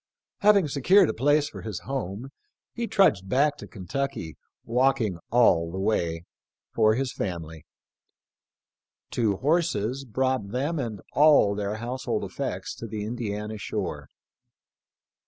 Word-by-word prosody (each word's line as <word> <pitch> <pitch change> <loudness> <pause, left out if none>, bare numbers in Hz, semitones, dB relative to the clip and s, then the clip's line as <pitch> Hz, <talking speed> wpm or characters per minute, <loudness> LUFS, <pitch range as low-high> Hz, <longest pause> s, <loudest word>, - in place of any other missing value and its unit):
Having 200 -6 +4
se 140 0 -4
cured 190 - +6
a - - -8
place 145 +4 +2
for - - -9
his 105 -5 -5
home 130 -2 -4 0.4
he 235 -1 -3
trudged 105 - +3
back 145 +4 +3
to - - -10
Ken 95 -4 -10
tucky 90 - -3 0.2
— - - -68
walking 115 -6 +1
all 85 -9 +4
the 95 - -6
way 85 -5 0 0.2
— - - -67
for 110 0 +4
his 130 +1 -2
family. 80 -5 -5 1.4
Two 110 -5 +1
horses 135 - 0
brought 130 -3 -1
them 140 +8 -1
and 110 -7 -4
all 145 -8 +5
their 100 0 -3
household 120 +4 -3
effects - - -4
to 115 - -6
the 105 -1 -5
Indiana 105 -2 -4
shore. - - -4
115 Hz, 140 wpm, -26 LUFS, 100-140 Hz, 1.4 s, cured